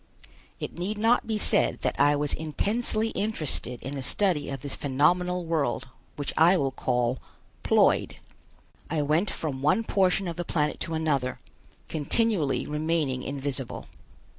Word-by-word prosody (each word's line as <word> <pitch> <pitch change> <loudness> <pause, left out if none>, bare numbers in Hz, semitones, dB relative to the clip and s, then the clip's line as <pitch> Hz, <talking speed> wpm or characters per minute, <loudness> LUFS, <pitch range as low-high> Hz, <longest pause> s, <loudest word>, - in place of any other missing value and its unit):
It - - -6
need 200 +4 -2
not 225 +2 +3
be 220 -1 0
said - - +2
that - - -1
I 145 +1 +5
was 145 0 0
intensely 215 +8 0
interested 155 - -2
in 135 - -5
the 140 - -4
study 175 +3 0
of 135 -2 -5
this 140 0 -2
phenomenal 175 +6 +1
world 160 -4 -1 0.3
which 145 -2 -4
I 175 +4 +6
will 135 -4 0
call 125 -1 0 0.4
Ploid. - - +3 0.8
I 155 -1 0
went 155 +7 +1
from 140 -7 -4
one 185 +10 +3
portion 190 -2 +2
of 170 - -4
the 175 - -2
planet 150 -3 -1
to 165 - -3
another, 140 -5 0 0.5
continually 160 0 0
remaining 150 -3 -1
invisible. 135 -2 -3
155 Hz, 145 wpm, -27 LUFS, 140-180 Hz, 0.8 s, I